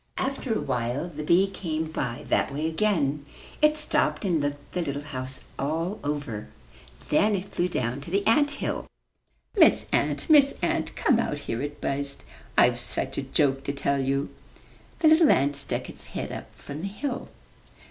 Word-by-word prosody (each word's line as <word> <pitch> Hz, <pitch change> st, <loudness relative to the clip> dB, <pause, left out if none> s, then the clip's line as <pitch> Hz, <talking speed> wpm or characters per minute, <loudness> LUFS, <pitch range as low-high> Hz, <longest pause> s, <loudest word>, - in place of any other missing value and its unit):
After 265 Hz, -3 st, -1 dB
a -, -, 0 dB
while 125 Hz, +8 st, -2 dB
the 155 Hz, -2 st, -7 dB
bee 170 Hz, +5 st, +4 dB
came 165 Hz, -5 st, -3 dB
by 120 Hz, -6 st, -3 dB
that -, -, +2 dB
way 145 Hz, +3 st, -2 dB
again. 160 Hz, -6 st, +1 dB, 0.4 s
It 305 Hz, 0 st, +5 dB
stopped 300 Hz, -7 st, 0 dB
and 170 Hz, -5 st, +2 dB
looked 145 Hz, 0 st, -4 dB
the 180 Hz, -, 0 dB
little 145 Hz, -3 st, -3 dB
house 130 Hz, -3 st, -6 dB, 0.2 s
all 165 Hz, +8 st, -1 dB
over. 145 Hz, -7 st, -3 dB, 0.6 s
Then 205 Hz, +7 st, +4 dB
it 195 Hz, +1 st, -5 dB
flew 175 Hz, -, +1 dB
down 125 Hz, -3 st, -2 dB
to 145 Hz, -, -9 dB
the 200 Hz, +3 st, 0 dB
ant 290 Hz, +6 st, +4 dB
hill. 290 Hz, -, -3 dB, 0.7 s
"Miss 400 Hz, -, +6 dB
Ant, -, -, +1 dB
Miss 290 Hz, -4 st, +6 dB
Ant, -, -, 0 dB
come 260 Hz, -8 st, +3 dB
out 145 Hz, -10 st, -1 dB
here, 115 Hz, -3 st, -3 dB
"it 145 Hz, +1 st, -5 dB
buzzed. 140 Hz, 0 st, -2 dB, 0.3 s
"I've 120 Hz, 0 st, +5 dB
such 130 Hz, +2 st, -3 dB
ajoke 135 Hz, 0 st, +1 dB
to 140 Hz, -, -1 dB
tell 140 Hz, 0 st, 0 dB
you." 135 Hz, +1 st, -1 dB, 0.7 s
The 320 Hz, -, +6 dB
little 315 Hz, 0 st, +6 dB
ant 140 Hz, +2 st, +3 dB
stuck 140 Hz, 0 st, 0 dB
its -, -, -6 dB
head -, -, -5 dB
up -, -, -6 dB
from 145 Hz, +2 st, -8 dB
the 195 Hz, -, -2 dB
hill. 245 Hz, +6 st, -4 dB
150 Hz, 175 wpm, -26 LUFS, 140-200 Hz, 0.7 s, Miss